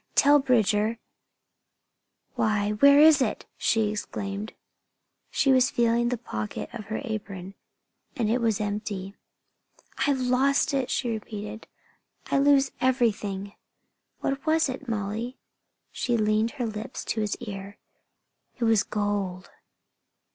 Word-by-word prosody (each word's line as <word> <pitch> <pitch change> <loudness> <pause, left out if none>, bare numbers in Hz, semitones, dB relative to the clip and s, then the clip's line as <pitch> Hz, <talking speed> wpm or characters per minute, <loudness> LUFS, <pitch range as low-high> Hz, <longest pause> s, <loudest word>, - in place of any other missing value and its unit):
Tell 290 +1 +6
Bridger 225 -4 +2 0.7
" - - -52
"Why, 210 -1 +1
where 280 +7 +6
is 305 -2 +7
it?" 235 - -1
she 220 -2 +1
exclaimed. 205 0 -5 0.8
She 275 - +2
was 255 -1 +5
feeling 235 0 +2
in 240 - +1
the 245 - -1
pocket 110 - -5
of 225 -4 -7
her 215 +2 -4
apron, 200 -5 -6 0.6
and 230 -4 0
it 235 +3 +1
was 225 -3 +1
empty. 205 -2 -3 0.9
"I've 280 -2 +2
lost 260 +3 +2
it!" 270 -2 0
she 240 -3 -1
repeated. 215 0 -6 0.6
"I 275 - +3
lose 275 -1 +4
everything!" 210 -6 0 0.7
"What 275 0 -2
was 315 -2 +3
it, 260 +1 -6
Molly?" 225 +4 -3 0.5
She 240 -2 0
leaned 215 +1 +2
her 260 -4 -3
lips 220 +3 -6
to 220 - -1
his 210 -1 -1
ear. 200 -3 -8 0.8
"It 245 - -3
was 225 -3 +4
gold!" 205 -4 -3
225 Hz, 130 wpm, -26 LUFS, 205-255 Hz, 0.9 s, is